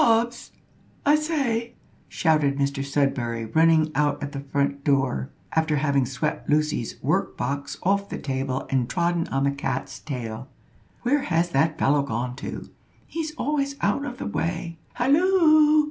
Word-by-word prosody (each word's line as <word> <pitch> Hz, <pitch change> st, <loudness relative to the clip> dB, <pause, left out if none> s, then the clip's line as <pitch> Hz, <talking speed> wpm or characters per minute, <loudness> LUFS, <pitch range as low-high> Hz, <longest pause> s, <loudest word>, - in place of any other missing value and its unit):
Hobbs! 235 Hz, +1 st, +1 dB, 0.5 s
I 290 Hz, -, +5 dB
say," 275 Hz, -7 st, 0 dB, 0.3 s
shouted 150 Hz, -4 st, +2 dB
Mr 140 Hz, 0 st, 0 dB
Sudberry, 130 Hz, -5 st, 0 dB
running 160 Hz, +3 st, +3 dB
out 145 Hz, -1 st, +1 dB
at 140 Hz, -, -4 dB
the 140 Hz, -, -5 dB
front 140 Hz, 0 st, -1 dB
door, 135 Hz, -, +1 dB, 0.2 s
after 160 Hz, -1 st, +1 dB
having 140 Hz, -3 st, +1 dB
swept 135 Hz, +4 st, -3 dB
Lucy's 150 Hz, -6 st, +1 dB
work -, -, 0 dB
box 140 Hz, +3 st, -3 dB
off 200 Hz, +2 st, +1 dB
the -, -, -4 dB
table 135 Hz, -1 st, -2 dB
and 130 Hz, -2 st, +1 dB
trodden 170 Hz, -1 st, 0 dB
on 135 Hz, 0 st, -1 dB
the 140 Hz, -, +2 dB
cat's 140 Hz, 0 st, -4 dB
tail. 120 Hz, -4 st, -5 dB, 0.6 s
"Where 280 Hz, +4 st, +2 dB
has 175 Hz, -6 st, 0 dB
that 150 Hz, +3 st, +2 dB
fellow 145 Hz, +1 st, +3 dB
gone 125 Hz, -2 st, -3 dB
to? -, -, -7 dB, 0.3 s
He's 315 Hz, -1 st, -4 dB
always 280 Hz, -2 st, -1 dB
out 280 Hz, -, +1 dB
of 250 Hz, -4 st, -5 dB
the -, -, -5 dB
way. 165 Hz, -3 st, -3 dB
Halloo!" 310 Hz, +2 st, +5 dB
150 Hz, 150 wpm, -25 LUFS, -, 0.6 s, I